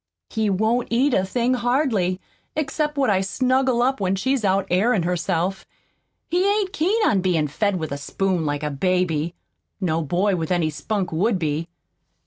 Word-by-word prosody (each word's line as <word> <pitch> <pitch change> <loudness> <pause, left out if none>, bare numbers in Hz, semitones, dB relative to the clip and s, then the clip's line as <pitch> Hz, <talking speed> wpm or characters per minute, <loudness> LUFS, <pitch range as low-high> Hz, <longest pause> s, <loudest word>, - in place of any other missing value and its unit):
He 220 -2 0
won't 220 +5 +1
eat 255 +4 +2
a 190 - +3
thing 240 +6 0
hardly, 240 -7 +1 0.4
except 300 0 -1
what 270 -6 +3
I 190 -1 +2
snuggle 255 +4 +1
up 265 +2 +1
when 190 0 +1
she's 260 +5 0
out 195 0 +2
airin' 200 +1 +2
herself. 180 +1 -1 0.6
He 355 +2 +1
ain't 405 -2 0
keen 400 +5 +1
on 195 -3 +2
bein' 170 -5 +1
fed 200 +7 0
with 160 -4 -4
a 140 - -3
spoon 185 +3 -1
like 145 -1 -2
a 150 - -1
baby. 170 0 0 0.4
No 165 -4 0
boy 180 +6 +1
with 165 -2 -3
any 170 -3 +1
spunk 180 +6 -3
would 195 +6 +1
be." 160 -1 -2
195 Hz, 170 wpm, -22 LUFS, 175-245 Hz, 0.6 s, a